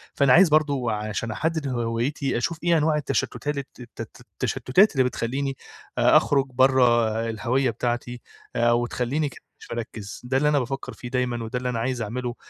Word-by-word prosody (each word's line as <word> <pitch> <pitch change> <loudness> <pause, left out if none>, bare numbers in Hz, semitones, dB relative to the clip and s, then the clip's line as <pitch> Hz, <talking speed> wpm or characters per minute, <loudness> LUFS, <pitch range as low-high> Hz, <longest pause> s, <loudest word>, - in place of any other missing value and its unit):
فأنا 140 -3 +4
عايز 175 0 +7
برضو 145 -5 +2
عشان 110 +1 -3
أحدد 160 +4 -1
هويتي 120 +2 -1
أشوف 160 +7 -2
ايه 170 -1 +4
أنواع 155 0 +2
التشتات 145 0 -2
الت 120 -2 -10
الت - - -10
التشتتات 190 +12 +2
اللي 130 - +3
بتخلّيني 135 +3 -2 0.4
آآ - - +6
أخرج 140 -1 +2
برا 120 -4 +3
الهوية 120 +5 0
بتاعتي، 120 0 -3 0.3
آآ 120 0 +3
وتخلّيني 125 +5 0
كده - - -15 0.2
مش - - -13
مركِّز، 110 -3 -6
ده 130 +2 +1
اللي 150 +2 +3
أنا 145 - +3
بافكر 130 -1 -4
فيه 120 +2 -8
دايمًا، 125 -2 -1
وده 115 +3 -3
اللي 125 0 -2
أنا 120 -2 -2
عايز 125 +1 -2
أعمله، 120 +3 -4
125 Hz, 175 wpm, -24 LUFS, 120-140 Hz, 0.4 s, عايز